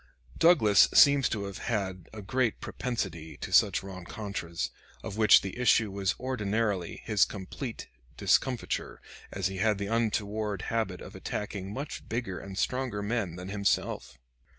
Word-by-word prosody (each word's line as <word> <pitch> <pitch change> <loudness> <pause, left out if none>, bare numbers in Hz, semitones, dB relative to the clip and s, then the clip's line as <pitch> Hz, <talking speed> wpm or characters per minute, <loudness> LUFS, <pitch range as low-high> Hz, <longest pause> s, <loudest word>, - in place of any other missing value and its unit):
Douglas 110 - +6
seems 140 -3 +7
to 105 -3 -2
have 100 -1 -6
had 95 -6 -3
a 110 -2 -8
great 125 +2 0
propensity 95 -10 -4
to - - -6
such - - +4
rencontres, 95 -2 -5 0.3
of 95 - -5
which 110 -1 +7
the 95 - -5
issue 115 -4 +4
was 100 0 -1
ordinarily 105 -6 -1
his 105 -2 +4
complete 110 +5 -5 0.3
discomfiture, 130 -3 0 0.3
as 95 -1 -3
he 95 0 -1
had 105 +1 +2
the 100 - -3
untoward 105 -3 -1
habit 110 -6 -1
of - - -10
attacking 100 -2 -4
much 140 +7 -6
bigger 115 -6 -3
and 95 -1 -8
stronger 125 -3 -1
men 100 -5 -1
than 90 +1 -7
himself. 100 -10 -1
105 Hz, 145 wpm, -29 LUFS, 95-115 Hz, 0.3 s, seems